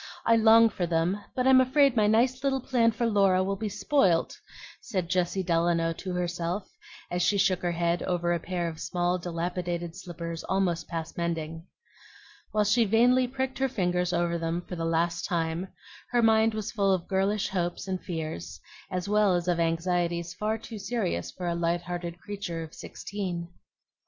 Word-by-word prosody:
I 230 - +5
long 225 0 +7
for 180 -5 -2
them, 170 +4 0
but 255 - 0
I'm 260 0 +7
afraid 270 0 +4
my 215 -2 +4
nice 245 +5 +2
little 270 -1 +1
plan 245 -3 +2
for 230 +2 -2
Laura 195 -4 +3
will 195 +1 -1
be 215 +2 -3
spoilt," 195 - +2 0.5
said 185 -6 -3
Jessie 185 +1 +1
Delano 165 -1 +1
to 185 +2 -6
herself, 180 +2 -2 0.4
as 175 0 0
she 200 +3 +3
shook 190 -2 +2
her 175 -1 -1
head 170 +1 0
over 175 -1 0
a 170 - 0
pair 175 0 -2
of 160 -1 -6
small, 175 0 0
dilapidated 175 0 -3
slippers 170 -3 -6
almost 180 -4 0
past 165 -1 -5
mending. 165 0 -3 0.8
While 210 -1 +2
she 215 +3 +3
vainly 245 +4 +4
pricked 265 +1 -3
her 270 0 +2
fingers 180 -5 0
over 170 0 0
them 165 +1 -2
for 180 - -5
the 165 -1 -3
last 165 +1 0
time, 170 0 -1 0.4
her 240 -1 +2
mind 220 0 +4
was 215 -2 -3
full 200 -3 +2
of 185 -3 0
girlish 195 +1 0
hopes 175 0 -2
and 185 -1 -3
fears, 160 -1 -5 0.3
as 180 0 -3
well 210 -2 +3
as 175 0 -2
of 175 -1 +1
anxieties 170 +1 0
far 215 +4 -1
too 225 -1 -9
serious 200 -2 -2
for 180 -1 -6
a 170 - +1
light 170 0 0
hearted 175 -1 -5
creature 195 -4 -5
of 160 - -11
sixteen. 180 -4 -5
180 Hz, 180 wpm, -28 LUFS, 170-210 Hz, 0.8 s, long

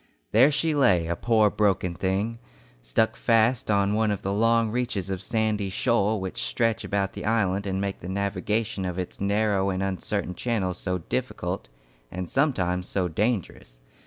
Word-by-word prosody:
There 125 +6 +6
she 155 +2 +1
lay, 95 - +3
a 85 +1 -1
poor 110 0 +3
broken 95 -4 +1
thing, 100 +6 -1 0.4
stuck - - +1
fast 115 +1 +2
on 100 -1 +2
one 110 0 +2
of 100 -2 -2
the 100 - -1
long 115 +1 +3
reaches 110 -6 -2
of 95 -1 -3
sandy 105 -1 0
shoal 105 +1 +1
which 95 -1 -4
stretch 115 -3 0
about 100 -1 -1
the - - -7
island 100 -3 +1
and 95 0 -1
make 100 0 -3
the 90 - -7
navigation 100 +2 -1
of 90 -1 -3
its 90 0 -5
narrow 100 -1 +1
and 95 0 -1
uncertain 95 0 -2
channels 95 -5 -2
so 90 -1 -1
difficult 80 - -4 0.4
and 90 0 -5
sometimes 90 - 0
so 95 -2 0
dangerous. 95 - -2
100 Hz, 165 wpm, -26 LUFS, 95-110 Hz, 0.4 s, There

